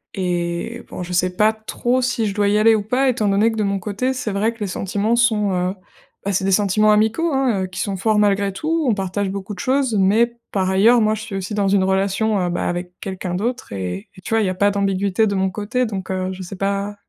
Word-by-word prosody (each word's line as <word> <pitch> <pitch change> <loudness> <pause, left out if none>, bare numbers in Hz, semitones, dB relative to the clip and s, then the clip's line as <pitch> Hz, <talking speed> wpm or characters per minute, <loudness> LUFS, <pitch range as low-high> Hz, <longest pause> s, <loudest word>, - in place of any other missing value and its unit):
Et 175 +4 -2
bon, 180 - -6
je 180 +1 -6
sais 180 +1 +1
pas 215 +2 +3
trop 240 +3 -1
si 240 -2 0
je 200 - -1
dois 205 0 +1
y 205 +1 +3
aller 225 +1 +5
ou 215 - +1
pas, 255 +5 +1
étant 225 -4 0
donné 205 +3 +3
que 225 - -6
de 215 - +1
mon 200 0 0
côté, 210 +7 -2
c'est 230 -5 -3
vrai 210 +3 +1
que 230 - -20
les 210 - -2
sentiments 200 +5 -1
sont, 220 -4 +2
heu, 180 +1 0 0.5
bah, 200 - 0
c'est 190 +1 0
des 195 - +1
sentiments 210 +2 +3
amicaux, 220 +11 +2
hein, 250 -8 +1
heu, - - -6
qui 180 0 -8
sont 200 -2 -2
forts 215 +3 +1
malgré 200 -1 +2
tout. 315 +9 -1
On 220 - +2
partage 195 0 -2
beaucoup 200 +1 -5
de 180 - -10
choses, 260 -2 +1
mais 225 +5 +3 0.2
par 190 -2 0
ailleurs, 215 +6 +5
moi 215 -1 +2
je 220 - -4
suis 220 -3 -7
aussi 195 +1 -4
dans 200 -1 +1
une 195 -1 +3
relation, 195 +3 +1
heu, 175 - 0
bah, 175 - -2
avec 175 0 -3
quelqu'un 185 -2 -4
d'autre 240 - -3
et 95 0 -5
et - - -12
tu 225 - -4
vois, 225 - +3
il 205 - +1
y - - +1
a 185 - -3
pas 205 +2 +3
d'ambiguïté 200 +1 +1
de 200 - -1
mon 190 0 0
côté, 225 +6 -1
donc 195 -4 -5
heu, 185 0 -2
je 185 - -9
sais 185 +2 -7
pas, 200 +2 -2
200 Hz, 265 wpm, -20 LUFS, 190-220 Hz, 0.5 s, aller